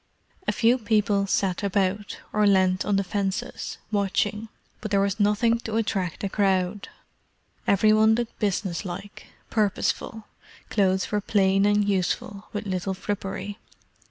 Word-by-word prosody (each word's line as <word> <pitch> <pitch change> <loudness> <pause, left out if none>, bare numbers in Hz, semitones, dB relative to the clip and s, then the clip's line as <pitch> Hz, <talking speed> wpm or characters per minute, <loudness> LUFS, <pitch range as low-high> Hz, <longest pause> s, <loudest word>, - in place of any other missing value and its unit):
A - - +3
few 240 +3 +3
people 210 -2 +1
sat 190 -2 0
about, 200 0 -1 0.2
or 210 -1 +3
leaned 185 -2 +3
on 205 - +1
the 195 - +2
fences, 195 0 -3
watching; 205 +1 0 0.3
but 215 - -5
there 200 -1 +2
was 200 +2 0
nothing 215 +3 +3
to 220 -1 -5
attract 195 -6 -1
a - - +1
crowd. 190 -1 0 0.8
Every 215 +2 +4
one 220 +1 +5
looked 235 0 -4
business 195 -4 -1
like, 195 +2 -8 0.2
purposeful; 215 +1 -1 0.5
clothes 190 -2 +1
were 210 0 +1
plain 195 -1 +3
and 205 0 +2
useful, 200 +1 -1
with 205 0 -4
little 190 0 -2
frippery. 200 +1 -4
200 Hz, 140 wpm, -25 LUFS, 190-210 Hz, 0.8 s, one